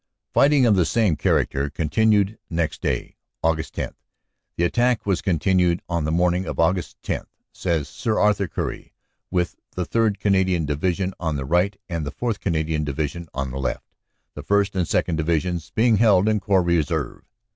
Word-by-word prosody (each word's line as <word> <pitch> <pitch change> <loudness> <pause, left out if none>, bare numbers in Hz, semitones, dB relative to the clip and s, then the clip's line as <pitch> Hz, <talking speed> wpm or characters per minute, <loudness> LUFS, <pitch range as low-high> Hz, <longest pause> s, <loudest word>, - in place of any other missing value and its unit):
Fighting 140 -2 +5
of 110 -3 +5
the 90 - +4
same 105 -2 +2
character 70 -1 +1
continued 100 +7 +1
next 85 -3 -2
day, - - -2 0.3
Aug. 80 -1 +1
10. - - -5 0.6
"The 85 - 0
attack 120 +6 +1
was 95 -3 +1
continued 90 -1 +1
on 85 -3 -1
the 80 - 0
morning 90 +2 +1
of - - -3
Aug. 85 +2 0
10," - - -2 0.3
says 80 -6 -1
Sir 110 -4 -2
Arthur 105 -2 +2
Currie, - - -5 0.4
"with 90 -1 -1 0.2
the 90 - -1
3rd. 110 -3 +1
Canadian 95 -5 +2
Division 90 +6 -1
on 80 -3 -1
the 70 -1 -3
right 90 +6 +1
and 85 -3 -3
the 75 - -4
4th. 115 +2 -2
Canadian 80 -3 -1
Division 75 +3 -3
on 70 -1 -2
the 65 - -5
left, 65 -1 -3 0.5
the - - -7
1st. 100 -1 +1
and 90 -2 +1
2nd. 80 - 0
Divisions 85 +1 -1
being 115 -1 +4
held 105 -3 +4
in 110 -1 +2
Corps 95 -1 +2
Reserve. 80 -5 0
90 Hz, 170 wpm, -23 LUFS, 80-100 Hz, 0.6 s, Fighting